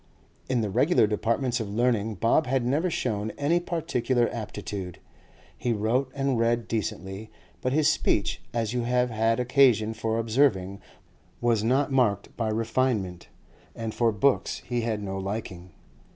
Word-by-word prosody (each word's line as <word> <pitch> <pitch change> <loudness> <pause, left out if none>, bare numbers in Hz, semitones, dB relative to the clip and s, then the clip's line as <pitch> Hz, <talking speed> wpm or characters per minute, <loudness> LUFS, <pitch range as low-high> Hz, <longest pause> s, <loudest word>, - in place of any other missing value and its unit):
In 125 -3 +1
the 105 -3 -2
regular 150 - +4
departments 115 +4 0
of 110 -3 -4
learning 110 -1 0
Bob 115 - +2
had 130 -1 +1
never 150 +8 +1
shown 110 -9 -2
any 155 +5 +2
particular 130 -9 0
aptitude; 100 -4 -6 0.6
he 120 - -1
wrote 120 +5 0
and 135 -3 0
read 115 0 +1
decently, 100 -1 -4 0.3
but 130 - 0
his 150 +2 +3
speech, 110 -9 +1
as 115 -1 -1
you 125 - 0
have 125 +1 +1
had 115 +1 +1
occasion 125 -4 +3
for 110 0 -2
observing, 110 -5 +1 0.6
was 115 -3 +1
not 135 +5 +2
marked 120 -7 +1
by 115 -2 -1
refinement, 110 -5 -1 0.5
and 115 -1 -4
for 115 -1 +2
books 120 +6 +1
he 120 -1 -1
had 110 -2 -2
no 95 -1 -4
liking. 95 -2 -5
115 Hz, 150 wpm, -26 LUFS, 105-130 Hz, 0.6 s, regular